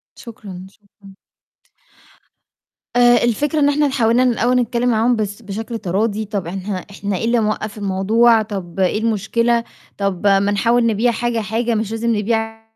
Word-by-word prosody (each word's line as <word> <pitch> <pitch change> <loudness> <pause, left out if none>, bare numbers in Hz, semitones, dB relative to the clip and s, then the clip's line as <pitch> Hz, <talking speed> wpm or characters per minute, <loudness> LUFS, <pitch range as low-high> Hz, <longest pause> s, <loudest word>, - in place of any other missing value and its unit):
شكرًا، 200 -6 -10
شكرًا. 200 -1 -19 1.8
آآ، 240 -1 +5
الفكرة 290 +6 0
إن 285 -1 +4
إحنا 290 0 +2
حاولنا 245 -1 +2
ن 250 - +3
الأول 245 +2 +1
نتكلّم 245 0 +1
معاهم 230 +2 +2
بس 210 0 -4
بشكل 225 +3 -6
تراضي. 210 +3 -1
طَب 200 -4 -4
إحنا- 190 +3 -4 0.2
إحنا 200 -1 -3
إيه - - -3
اللي 235 +1 +2
موقّف 215 0 -2
الموضوع، 215 +4 +3
طَب 195 -5 -6
إيه 190 +2 +1
المشكلة، 230 +2 0 0.3
طَب 200 -1 -1
ما 195 -1 +5
نحاول 230 +4 +2
نبيع 230 +2 +2
حاجة، 235 0 -1
حاجة 225 +2 -1
مش 215 -1 -2
لازم 225 0 0
نبيع 225 +1 -2
225 Hz, 155 wpm, -19 LUFS, 200-235 Hz, 1.8 s, آآ